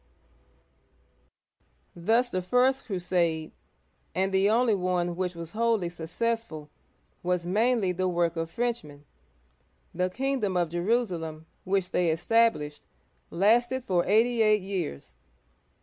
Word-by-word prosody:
Thus 230 +8 +1
the 185 - -1
first 250 +8 +2
crusade 175 -5 -1 0.3
— 65 - -42
and 190 +1 0
the 190 +1 +4
only 230 +1 +3
one 180 -2 -1
which 180 -1 -2
was 170 -1 -7
wholly 225 -5 +1
successful 170 -1 -3 0.2
— - - -42
was 180 -1 -1
mainly 215 +1 +2
the 185 +1 -1
work 175 -1 0
of 165 0 -3
Frenchmen. 165 -10 -4 0.9
The 180 +1 0
kingdom 255 -4 -1
of 175 -2 +1
Jerusalem, 175 -4 -1 0.2
which 190 -1 0
they 175 -2 +2
established, 170 -3 +1 0.4
lasted 240 +8 +2
for 180 -7 +1
eighty 225 +4 +3
eight 215 -2 +3
years. 185 - -5
185 Hz, 120 wpm, -27 LUFS, 170-230 Hz, 0.9 s, the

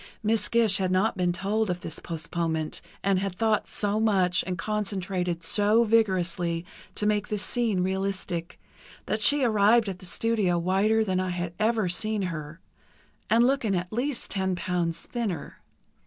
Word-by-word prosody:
Miss 215 -1 +1
Gish 225 -4 +3
had 190 -1 0
not 190 +4 +2
been 180 -2 +1
told 200 +4 -1
of 180 0 -2
this 165 - -6
postponement, 165 -1 -3 0.2
and 195 -1 +2
had 195 -1 -3
thought 220 0 +1
so 205 0 -1
much 190 -5 +2
and 180 -1 -2
concentrated 185 -4 -2
so 210 +6 +4
vigorously 180 -6 +1 0.3
to 210 - -1
make 210 -1 +1
this 210 -1 -2
scene 225 -6 0
realistic, 190 -3 -3 0.5
that 215 - -1
she 285 +6 +7
arrived 220 0 +4
at 190 -2 -5
the 185 - -6
studio 210 -4 0
whiter 200 +6 +2
than 185 -2 0
I 185 0 -1
had 175 -1 -3
ever 220 -2 +1
seen 210 +4 -1
her 165 -2 -5 0.7
and 230 +2 +5
looking 245 -7 +1
at 180 +2 -3
least 250 +3 -2
ten 190 -2 -1
pounds 170 -1 -2
thinner. 215 -11 -4
195 Hz, 160 wpm, -26 LUFS, 180-215 Hz, 0.7 s, she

